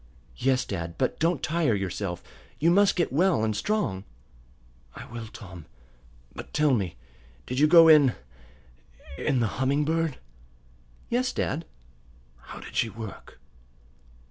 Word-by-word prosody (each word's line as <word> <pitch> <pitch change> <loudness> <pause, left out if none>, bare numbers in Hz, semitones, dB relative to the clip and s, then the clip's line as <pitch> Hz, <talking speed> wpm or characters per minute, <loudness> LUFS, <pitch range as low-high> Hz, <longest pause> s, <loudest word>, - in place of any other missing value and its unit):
"Yes, 130 -1 +1
dad. 85 -3 -5
But 130 - -1
don't 165 -2 0
tire 160 -8 +1
yourself. 95 -2 -4 0.3
You 165 +3 +3
must 200 +2 +4
get 170 -7 0
well 170 - +2
and 110 -1 0
strong." 205 - -1 0.9
"I - - -9
will, 115 -2 -8
Tom. 95 -7 -11 0.7
But - - -10
tell 150 -2 +3
me; 95 -8 -1 0.5
did 125 +1 -3
you 150 - +5
go 165 0 +8
in 150 -6 +6 1.0
in 135 -5 +1
the 115 +1 -2
Humming 140 +3 +1
Bird?" 160 -2 0 0.9
"Yes, 250 +1 0
dad." 160 - -2 0.7
"How - - -11
did - - -11
she 115 - +1
work?" 110 -1 -10
135 Hz, 135 wpm, -26 LUFS, 110-165 Hz, 1.0 s, go